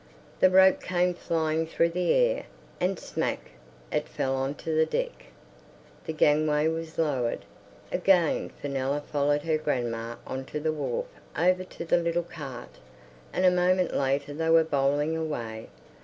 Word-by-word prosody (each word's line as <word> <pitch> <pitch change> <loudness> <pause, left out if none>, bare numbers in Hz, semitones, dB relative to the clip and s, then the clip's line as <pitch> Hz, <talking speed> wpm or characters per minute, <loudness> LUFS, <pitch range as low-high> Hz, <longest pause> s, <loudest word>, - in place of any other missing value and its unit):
The 185 - +6
rope 190 0 +6
came 180 0 +1
flying 160 -2 -1
through 165 +1 +2
the 180 +1 +1
air, - - +2 0.3
and 185 +1 0
"smack" - - -3 0.4
it - - -1
fell 135 0 -1
on 135 +2 -2
to 160 - -4
the 160 0 +3
deck. - - -3 0.8
The - - -1
gangway 150 0 +3
was 160 0 -5
lowered. 130 -10 0 0.5
Again 180 -3 +2
Fenella 140 0 -2
followed 145 0 0
her 160 -1 +1
grandma 120 -5 -2
on 130 0 -5
to 150 - -5
the 155 +1 0
wharf 320 - -2 0.3
over 185 +1 +3
to 180 - -8
the 170 - +3
little 170 0 0
cart, 140 -8 -9 0.5
and 185 - +1
a 180 - +7
moment 180 0 +2
later 140 +1 0
they 160 +2 -1
were 165 0 +6
bowling 145 +1 +1
away. 120 -9 -4
160 Hz, 155 wpm, -27 LUFS, 140-175 Hz, 0.8 s, a